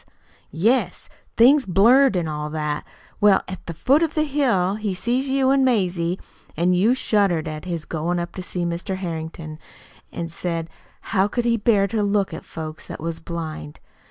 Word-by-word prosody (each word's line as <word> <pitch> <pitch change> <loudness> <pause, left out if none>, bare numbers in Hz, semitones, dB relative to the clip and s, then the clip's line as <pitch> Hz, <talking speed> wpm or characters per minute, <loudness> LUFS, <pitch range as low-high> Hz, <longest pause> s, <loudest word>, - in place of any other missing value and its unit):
"Yes 205 +1 0 0.3
things 260 +3 +6
blurred, 235 +5 +5
an' 170 -2 -1
all 150 0 -4
that. 150 -1 -3 0.3
Well, 205 -2 +5
at 185 0 -7
the 170 - -4
foot 270 - +3
of 325 -2 0
the 310 - +2
hill 255 -11 +1
he 210 -3 -2
see 240 +7 0
you 270 -1 +2
an' 270 -1 +3
Mazie, 185 -7 +1 0.4
an' 175 +3 +2
you 210 +8 +3
shuddered 195 -10 +1
at 155 +1 -6
his 170 -4 -4
goin' 170 +2 -2
up 170 0 -3
to 185 - -6
see 180 -1 -3
Mr. 170 +3 -3
Harrington, 160 -3 -6 0.5
an' 165 -1 -5
said 165 0 -4 0.4
how 190 +1 +3
could 240 +3 -2
he 235 -1 +3
bear 210 -2 +3
to 210 +2 -1
look 200 -3 +1
at 160 - -8
folks 155 -1 -8
that - - -7
was 165 +1 -4
blind. 160 -2 -6
185 Hz, 180 wpm, -22 LUFS, 165-230 Hz, 0.5 s, things